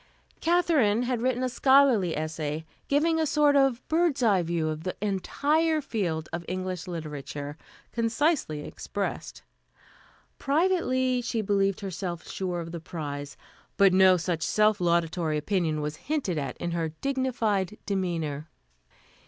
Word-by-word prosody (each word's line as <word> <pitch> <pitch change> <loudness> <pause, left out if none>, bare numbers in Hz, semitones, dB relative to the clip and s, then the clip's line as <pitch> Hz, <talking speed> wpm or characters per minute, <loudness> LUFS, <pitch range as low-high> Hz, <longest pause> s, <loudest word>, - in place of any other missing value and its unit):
Katherine 320 -11 +3
had 245 -2 -1
written 255 0 0
a - - +2
scholarly 255 - +4
essay, 155 0 -3 0.2
giving 320 +3 +2
a 315 - +1
sort 295 0 +3
of 270 -3 +2
bird's 320 -5 +1
eye 200 -5 +4
view 165 -1 -1
of 155 0 -4
the 185 - -3
entire 295 - +1
field 180 - -2
of 170 - -3
English 185 -1 -4
literature, 145 -3 -6 0.4
concisely 230 - 0
expressed. 200 -1 -5 1.0
Privately, 275 -6 +1
she 230 -2 -2
believed 195 -1 +1
herself 180 -3 -5
sure 180 -2 -3
of 165 0 -7
the 170 - -5
prize, 145 -3 -6 0.4
but 195 -2 +6
no 185 -1 +6
such 170 -1 -2
self 215 +2 +2
laudatory 170 -2 +1
opinion 160 -1 0
was 150 +1 -4
hinted 275 - -2
at 140 - -4
in 175 - -3
her 165 -1 -1
dignified 220 - -1
demeanor. 165 -6 -2
195 Hz, 135 wpm, -27 LUFS, 165-260 Hz, 1.0 s, but